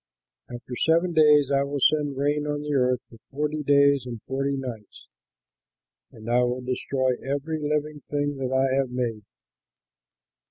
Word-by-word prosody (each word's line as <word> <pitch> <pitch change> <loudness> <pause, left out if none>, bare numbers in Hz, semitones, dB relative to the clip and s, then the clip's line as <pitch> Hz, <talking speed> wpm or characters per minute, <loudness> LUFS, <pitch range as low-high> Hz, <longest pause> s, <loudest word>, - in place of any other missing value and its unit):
After 120 +1 -8
seven 170 +2 +2
days 150 -3 +5
I 140 0 +3
will 140 +1 -2
send 145 -1 +2
rain 145 +1 0
on 145 0 -2
the 150 0 -3
earth 125 -2 +2
for 115 - -17
forty 150 +2 -2
days 140 -2 +3
and 120 -2 -6
forty 135 +1 -2
nights; 120 -6 -8 1.1
and 110 0 -13
I 120 +1 +3
will 125 +1 -1
destroy 130 +1 -1
every 145 +4 -3
living 150 0 -2
thing 145 -1 -1
that 130 -1 -3
I 130 0 +2
have 135 -2 0
made." 120 -3 -3
140 Hz, 155 wpm, -25 LUFS, 125-150 Hz, 1.1 s, days